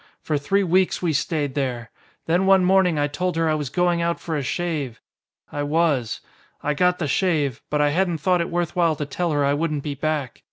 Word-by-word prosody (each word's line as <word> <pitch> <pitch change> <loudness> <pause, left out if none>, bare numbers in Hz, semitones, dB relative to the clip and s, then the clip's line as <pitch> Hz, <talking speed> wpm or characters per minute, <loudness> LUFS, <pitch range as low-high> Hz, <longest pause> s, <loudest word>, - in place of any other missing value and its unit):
For 150 -2 -1
three 195 +8 +1
weeks 185 +1 +1
we 165 -3 +1
stayed 145 -1 -1
there. 125 -4 -3 0.3
Then 175 +4 +2
one 190 -1 +5
morning 185 -3 +3
I 145 - +2
told 180 +5 -2
her 165 0 +1
I 155 - +2
was 150 -4 -2
going 175 +1 +1
out 170 0 0
for 165 - -4
a 145 - -1
shave. 145 -3 -3 0.5
I 145 - -3
was. 145 -5 0 0.4
I 150 - +1
got 180 +4 +2
the 160 - -2
shave. 150 - 0
But 150 0 +1
I 145 - +3
hadn't 175 +1 +1
thought 180 +3 +1
it 170 - -2
worth 175 -1 -2
while 170 -3 +2
to 150 - -4
tell 170 +5 -2
her 145 -1 +1
I 140 - +2
wouldn't 150 -1 -1
be 150 - -3
back. 145 -3 -3
160 Hz, 220 wpm, -23 LUFS, 145-175 Hz, 0.5 s, one